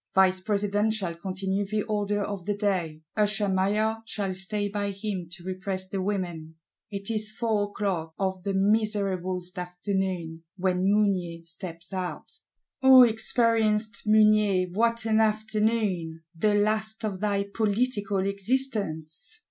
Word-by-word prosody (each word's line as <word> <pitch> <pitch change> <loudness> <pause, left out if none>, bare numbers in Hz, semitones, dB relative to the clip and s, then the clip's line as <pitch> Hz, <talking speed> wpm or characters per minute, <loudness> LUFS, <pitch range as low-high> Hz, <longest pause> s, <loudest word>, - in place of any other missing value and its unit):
Vice 190 -1 +5
President 205 +2 0
shall 185 -6 -2
continue 190 +3 -2
the 210 +1 -1
order 205 -1 -1
of 200 -3 -5
the 205 -1 0
day; 175 -7 -1
Usher 210 -1 +2
Maillard 205 +4 +1
shall 200 -4 -2
stay 205 +2 -1
by 205 0 -2
him 195 -3 -4
to 175 -1 -11
repress 185 0 -3
the 195 0 -3
women. 175 -5 -3 0.3
It 200 +1 -5
is 215 -1 -1
four 220 -3 0
o'clock, 190 -6 -3
of 190 -1 -1
the 195 +1 -2
miserablest 195 -3 0
afternoon, 180 -2 -3
when 185 -1 +1
Mounier 185 -5 +1
steps 170 +2 -8
out. 185 -1 -4 0.5
O 265 -1 +9
experienced 225 -1 +2
Mounier, 210 -3 +4
what 230 +2 +1
an 220 -1 +3
afternoon; 215 -6 0
the 205 +5 +2
last 215 +2 0
of 195 -3 -3
thy 200 -1 +1
political 205 -3 0
existence! 200 - -2
200 Hz, 130 wpm, -27 LUFS, 185-215 Hz, 0.5 s, O